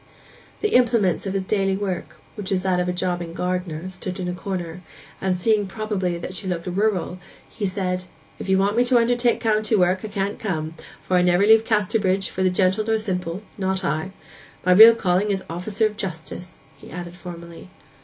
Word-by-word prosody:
The 425 - +1
implements 230 -7 +3
of 195 - -3
his 195 - 0
daily 195 -1 0
work, 190 -3 -4 0.2
which 205 -3 -7
was 185 -2 0
that 185 -2 +1
of 180 0 0
a - - +2
jobbing 175 -2 -2
gardener, 180 -2 -3
stood 185 0 -6
in 180 - -3
a 180 - -2
corner, 180 -2 -5 0.4
and 190 -1 0
seeing 210 +2 +2
probably 190 -4 -2
that 175 +2 -6
she 190 +1 -3
looked 175 -2 -3
rural, 185 -1 -1 0.3
he 205 -3 -3
said, 185 -1 -2 0.3
'If - - -6
you 190 - +4
want 200 +2 +2
me 240 - +4
to 245 0 +4
undertake 240 +1 +2
country 215 -1 +1
work 180 0 +3
I - - -3
can't 200 -1 -3
come, 160 -6 -3 0.3
for 185 - +1
I - - +4
never 180 +2 +3
leave 220 +1 +6
Casterbridge 205 -3 +1
for 185 0 +1
gentle 185 +3 +2
nor 220 +1 +1
simple—not 190 -1 -3
I. 155 +5 -1 0.6
My 185 - +4
real 220 +5 +10
calling 190 -1 +1
is 195 -2 -1
officer 195 +6 -1
of 210 -1 -2
justice,' 180 -2 -6 0.3
he - - -13
added 175 0 -7
formally. 170 0 -10
190 Hz, 190 wpm, -23 LUFS, 180-210 Hz, 0.6 s, real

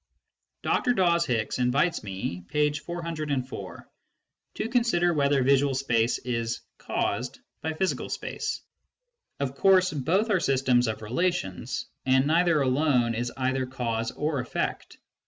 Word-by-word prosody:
Dr. 245 - +2
Dawes 170 -4 +3
Hicks 115 -1 -1
invites 125 +7 +1
me 95 -3 -4
(p. 150 0 +1
404) 155 -5 -4 0.7
to - - -2
consider 230 -8 +2
whether 140 -3 +2
visual 140 +1 +3
space 120 -3 +1
is 115 -2 -3 0.2
"caused 125 +5 -2
" - - -53
by 160 +1 -2
physical 185 +4 -1
space. 440 -1 -3 0.8
Of 140 -2 -1
course 185 +2 +4
both 180 - +1
are 190 - +3
systems 130 -5 +2
of 110 0 -3
relations, 115 - -1 0.2
and 130 +1 +3
neither 165 -1 +3
alone 130 -3 +2
is 120 +1 -2
either 130 0 0
cause 115 -3 -2
or 150 -2 -1
effect. 125 - -3
140 Hz, 130 wpm, -27 LUFS, 125-170 Hz, 0.8 s, course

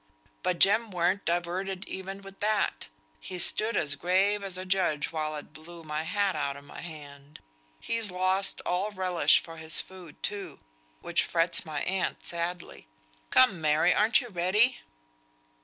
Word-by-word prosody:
But 180 -1 0
Jem 215 +5 +4
weren't 185 +2 0
diverted 180 +3 -2
even 195 +1 -6
with 195 0 -12
that; 210 0 0 0.3
he 185 - -6
stood 215 +5 +1
as 145 -1 +1
grave 190 +6 +2
as 190 -2 0
a 185 - -5
judge 185 -6 0
while 155 -1 -3
it 150 0 -9
blew 165 +2 -11
my 150 0 -3
hat 195 +3 0
out 140 -2 -2
o' - - -11
my 145 - -10
hand. 145 -3 -11 0.4
He's 230 - -1
lost 185 +2 0
all 185 +4 0
relish 185 -4 +3
for 165 0 -10
his 160 0 +2
food, 180 -5 -10
too, 195 -7 -3 0.4
which - - +1
frets 170 -1 +2
my 150 -2 -3
aunt 190 0 -2
sadly. 170 - -2 0.4
Come! 230 -10 +4
Mary, 155 0 +3
ar'n't 220 +4 +4
you 245 - -9
ready?" 205 +7 +2
180 Hz, 155 wpm, -28 LUFS, 160-195 Hz, 0.4 s, Jem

